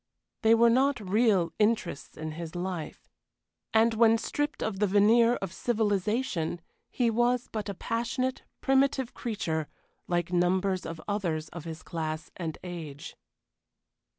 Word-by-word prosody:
They 225 0 +6
were 235 0 +5
not 270 +2 +3
real 200 -3 +2
interests 215 -8 0
in 155 0 -4
his 165 +1 -7
life. 175 -3 -5 0.6
And 225 +1 +4
when 225 0 +5
stripped 290 +6 -2
of 195 -3 -2
the 210 - +3
veneer 225 +4 +5
of 195 -5 -5
civilization 210 -6 0 0.3
he 240 -2 +1
was 240 +2 +1
but 215 -2 -3
a 200 - -4
passionate, 240 +5 -2 0.2
primitive 270 -2 +2
creature, 160 -9 -2 0.4
like 175 0 -1
numbers 185 +1 +1
of 165 0 -6
others 170 -7 -2
of 170 -2 -9
his 160 -1 -7
class 155 -1 -4
and 165 -3 -4
age. 160 -5 -7
205 Hz, 135 wpm, -29 LUFS, 170-230 Hz, 0.6 s, They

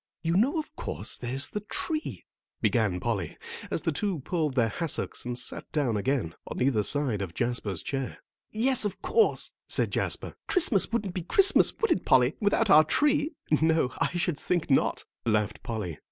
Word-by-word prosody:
"You 165 +1 0
know, 255 - +2
of 315 - -5
course, - - -4
there's 130 +3 -2
the 210 - -4
tree," 310 - -4 0.3
began - - +1
Polly, - - -3 0.3
as - - -2
the - - 0
two 195 -8 -2
pulled 155 -2 -2
their 120 -3 +3
hassocks 155 +4 -3
and 120 0 -4
sat 125 - -4
down 135 -7 0
again, 105 - -1
on - - -6
either 125 -4 +2
side 125 -3 +1
of 90 -4 -6
Jasper's 115 -7 -2
chair. 135 -2 -4 0.3
"Yes, 250 +3 +3
of 205 -3 -2
course," 450 0 +2
said - - +1
Jasper. - - -1
"Christmas 260 - +4
wouldn't 205 -5 -2
be 180 - -3
Christmas, 390 - +5
would 455 - 0
it, 185 - +1
Polly, 130 +2 +4
without 210 0 +2
our 155 +1 +8
tree." 295 - +1 0.3
"No, 160 -5 +2
I - - +1
should 170 -3 -1
think 175 -4 -1
not," 135 - +1 0.2
laughed 110 -2 0
Polly. 105 -9 -5
155 Hz, 175 wpm, -27 LUFS, -, 0.3 s, our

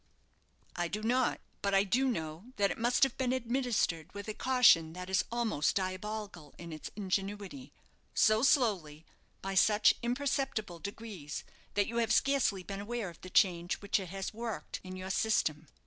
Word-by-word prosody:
"I 175 0 -1
do 210 +5 -4
not; 245 +2 +2 0.2
but 200 -1 +1
I 195 - +5
do 245 +7 +2
know 160 -5 -3
that 200 -1 +2
it - - -5
must 240 +3 +3
have 270 -3 +3
been 255 -2 +1
administered 240 - 0
with 205 0 -6
a 215 - -3
caution 220 -11 +5
that 180 +1 -7
is 190 - +3
almost 230 -10 +1
diabolical 190 -4 -4
in 170 -1 -8
its 155 - -7
ingenuity 205 +5 -3 0.4
so 215 0 +4
slowly, 190 - +2 0.4
by 195 0 -3
such 210 +2 +5
imperceptible 245 -7 -1
degrees, 200 -7 -6 0.3
that 205 0 +3
you 235 - -4
have 230 -2 +1
scarcely 245 -7 +2
been 195 +1 -5
aware 225 -1 -3
of 170 - -19
the 185 - -9
change 180 -2 +3
which 200 0 0
it 185 -3 -6
has 195 +2 -4
worked 230 -1 -5
in 185 0 -7
your 185 +1 -4
system. 160 -8 +1
205 Hz, 170 wpm, -32 LUFS, 185-235 Hz, 0.4 s, I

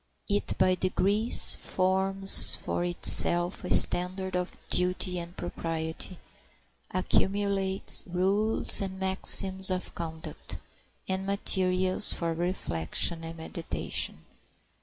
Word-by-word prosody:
It 205 0 -4
by 185 0 0
degrees 200 +4 +1
forms 190 +1 +2
for - - -7
itself 175 +1 +5
a 180 - -9
standard 185 +1 +4
of 180 0 -6 0.2
duty 180 0 -4
and 170 +1 -13
propriety, 165 +1 -8 0.7
accumulates 195 +1 -2
rules 195 +6 +2
and 190 -1 -8
maxims 190 0 +4
of 185 -1 -5
conduct, 160 -2 -11 0.5
and 190 +1 -7
materials 185 -1 -2
for 170 -1 -6
reflection 165 - -4
and 165 0 -11
meditation. 160 +1 -7
185 Hz, 95 wpm, -24 LUFS, 175-190 Hz, 0.7 s, itself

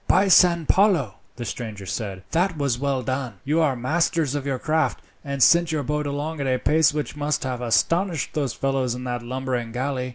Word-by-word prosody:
"By 190 +2 +4
San 170 -3 +5
Paolo," 175 - +2 0.2
the 120 - -6
stranger 105 -3 -6
said, 95 -1 -5
"that 175 0 +1
was 140 -5 0
well 135 -2 -1
done! 130 -2 -3
You 150 +4 +1
are 145 -5 +2
masters 155 +3 0
of 145 -1 -3
your 135 -2 -1
craft, 155 -1 0 0.2
and 140 -2 0
sent 170 -1 +5
your 155 -2 -1
boat 150 +2 -2
along 145 +2 -3
at 140 - -1
a 130 -1 +2
pace 155 +3 +3
which 150 0 -4
must 150 0 -1
have 125 -2 -3
astonished 165 - +1
those 140 -6 -1
fellows 135 -3 -1
in 125 - -7
that 125 -1 -3
lumbering 125 -1 -3
galley. 130 +1 -2
140 Hz, 200 wpm, -23 LUFS, 125-155 Hz, 0.2 s, San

